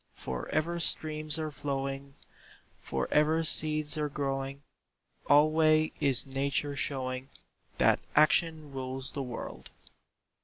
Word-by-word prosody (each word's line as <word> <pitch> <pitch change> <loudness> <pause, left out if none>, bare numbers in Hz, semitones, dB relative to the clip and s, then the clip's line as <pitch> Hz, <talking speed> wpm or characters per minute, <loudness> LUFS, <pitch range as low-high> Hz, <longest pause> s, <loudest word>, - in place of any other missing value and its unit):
For 65 -1 -6
ever 170 +3 -1
streams 155 -2 +4
are 155 -1 -4
flowing, 140 -1 -5 0.6
For - - -3
ever 155 +2 +2
seeds 155 -1 +1
are 150 -1 -1
growing, 135 -1 -4 0.7
Alway 155 +1 +4
is 130 -6 +4
Nature 140 +1 -2
showing 130 -1 -3 0.5
That - - +3 0.2
Action 155 0 +2
rules 130 0 -5
the 140 - -5
world. 125 -3 -8
145 Hz, 110 wpm, -29 LUFS, 135-155 Hz, 0.7 s, streams